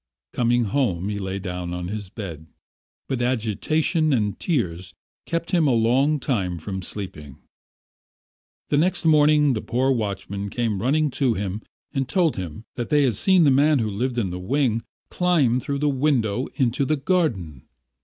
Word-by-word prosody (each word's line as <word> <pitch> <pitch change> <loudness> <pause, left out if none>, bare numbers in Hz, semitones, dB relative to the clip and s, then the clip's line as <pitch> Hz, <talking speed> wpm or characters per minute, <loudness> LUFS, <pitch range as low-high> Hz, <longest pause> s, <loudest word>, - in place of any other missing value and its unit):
Coming 120 0 +2
home, 100 -5 0
he 100 -1 -3
lay 95 0 -3
down 90 -2 -4
on 90 0 -4
his 105 -2 -5
bed, 85 -7 -8 0.6
but 130 -3 -2
agitation 130 - 0
and 105 -5 0
tears 90 - -2 0.3
kept 170 +1 -2
him 170 -5 +3
a 135 - +3
long 130 +7 +2
time 95 - -1
from 95 +4 -5
sleeping... 85 -8 -7 1.3
The 145 - +2
next 175 +3 +1
morning 150 -2 +5
the 110 - -2
poor 130 +3 0
watchman 100 -3 -3
came 110 -4 -1
running 145 +5 +1
to 125 -4 +3
him 100 +1 -3 0.3
and 135 -3 -1
told 170 0 +2
him 90 +1 -6
that 120 - -4
they 145 -1 +4
had 130 -4 +2
seen 185 - +4
the 145 - +5
man 145 +3 +4
who 110 -4 -1
lived 120 +5 -2
in 100 -6 0
the 90 - -5
wing 115 +3 0 0.3
climb 155 -9 +2
through 140 +2 -3
the 150 +1 0
window 130 -5 +1
into 130 +1 +1
the 150 +3 +1
garden. 130 - -1
120 Hz, 165 wpm, -23 LUFS, 100-145 Hz, 1.3 s, morning